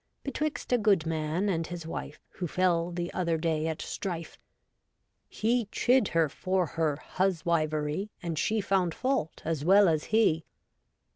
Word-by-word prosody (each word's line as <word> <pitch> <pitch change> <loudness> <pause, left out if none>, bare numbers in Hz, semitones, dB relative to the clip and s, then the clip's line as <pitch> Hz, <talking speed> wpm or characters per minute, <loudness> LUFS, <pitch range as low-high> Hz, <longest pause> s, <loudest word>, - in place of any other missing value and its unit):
Betwixt 295 -1 -2
a 245 - +4
good 200 -6 +3
man 160 +4 -1
and 165 -4 0
his 175 -2 -6
wife 155 -2 -6
Who 180 - -5
fell 175 0 +1
the 175 0 -4
other 170 -3 0
day 160 -1 0
at 160 -1 -3
strife. 170 -4 -5 0.9
He 235 +2 +1
chid 250 -4 +3
her 165 -1 +2
for 185 +5 0
her 160 -2 0
huswivery. 165 -1 0
And 165 -3 -2
she 220 0 +1
found 190 -4 +1
fault 260 - -1
as 160 -3 -1
well 195 +4 +6
as 155 -2 +1
he. 210 -8 +3
170 Hz, 150 wpm, -29 LUFS, 160-195 Hz, 0.9 s, well